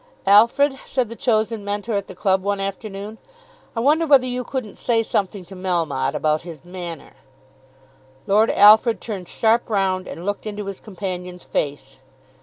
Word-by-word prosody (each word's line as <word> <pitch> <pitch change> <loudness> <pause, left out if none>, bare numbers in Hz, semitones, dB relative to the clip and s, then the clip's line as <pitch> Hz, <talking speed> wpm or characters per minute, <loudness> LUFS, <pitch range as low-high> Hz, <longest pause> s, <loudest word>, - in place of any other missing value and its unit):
"Alfred," 235 +7 +5
said 250 -4 -1
the 230 - -7
chosen 220 -2 0
mentor 205 +2 -3
at 200 -1 -1
the 185 - -10
club 190 0 +1
one 200 +1 -1
afternoon, 200 +2 -5 0.6
"I 230 - -1
wonder 310 +6 +3
whether 275 -3 +6
you 250 0 -3
couldn't 250 -5 -5
say 230 -2 +1
something 200 -3 -2
to 190 +3 -12
Melmotte 165 -8 -1
about 155 0 +1
his 165 -3 -11
manner." 175 -3 -8 1.1
Lord 215 +3 +3
Alfred 220 +3 +6
turned 195 -6 -6
sharp 230 +2 +1
round 190 -3 0
and 170 - -8
looked 205 +2 -3
into 210 -1 -5
his 195 -1 -6
companion's 180 -3 -6
face. 135 -2 -4
200 Hz, 160 wpm, -21 LUFS, 180-225 Hz, 1.1 s, whether